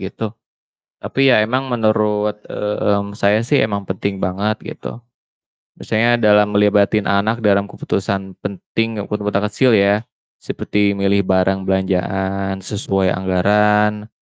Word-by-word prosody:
gitu. 100 +3 -5 0.7
Tapi 135 -1 +2
ya 110 - +5
emang 130 +5 -1
menurut, 105 -3 0
mmm, 100 0 -2
saya 105 +2 +2
sih 130 +5 +1
emang 100 -2 -5
penting 95 +1 -3
banget 100 +4 -2
gitu. 120 - -8 0.8
Misalnya 120 +2 +1
dalam 105 -1 +4
ngelibatin 105 0 +2
anak 110 +4 +1
dalam 100 -2 +2
keputusan 95 -1 -4
penting, 110 +2 -3
kepu 100 - -7
keputusan 105 -1 -1
kecil 125 +4 +2
ya. 105 +1 +3 0.4
Seperti 105 -1 -1
milih 100 0 +2
barang 95 +1 +1
belanjaan 95 0 -1
sesuai 95 -2 -1
anggaran 105 +3 +1
105 Hz, 120 wpm, -18 LUFS, 100-105 Hz, 0.8 s, ya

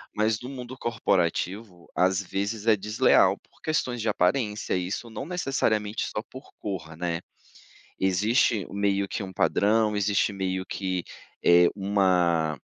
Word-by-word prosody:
Mas 110 0 +1
no 125 - -7
mundo 130 -1 -8
corporativo, 95 -3 -1
às 95 +2 +2
vezes 100 +4 -3
é 110 - +6
desleal 105 +2 +3
por - - -30
questões 130 -6 -1
de 115 - -2
aparência, 105 +3 0
isso 95 +6 -3
não 115 - -6
necessariamente 115 - -1
só 105 - 0
por 130 +2 -12
cor, 85 -6 -5
né. 85 0 -2 0.8
Existe 100 +2 +2
meio 100 0 0
que - - -4
um 95 -1 -6
padrão, 105 +3 +2
existe 105 +1 +1
meio 95 -1 -2
que, 95 -3 -3 0.4
eh, 85 0 +7
uma, 90 -6 +2
100 Hz, 135 wpm, -26 LUFS, 95-110 Hz, 0.8 s, eh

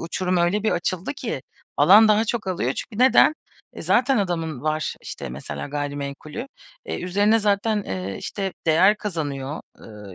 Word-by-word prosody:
uçurum 180 +2 -1
öyle 175 +4 +1
bir 220 - +1
açıldı 180 +5 -2
ki 225 - -4 0.3
alan 200 +9 +7
daha 215 +1 +4
çok 220 -2 -3
alıyor. 170 -9 -1
Çünkü 220 -2 -7
neden? 265 +3 +6 0.4
E, - - -9
zaten 270 -5 +3
adamın 165 -7 -2
var, 155 0 -1
işte, - - -7
mesela, 65 - -6
gayrimenkulü. 145 - -5 0.4
E, - - -4
üzerine 205 +5 +2
zaten, 210 0 +1
eee, 95 +1 -4
işte, 195 -2 -4
değer 185 +7 +5
kazanıyor, 150 -8 -4 0.2
ııı, 105 -3 -11
175 Hz, 155 wpm, -23 LUFS, 145-210 Hz, 0.4 s, alan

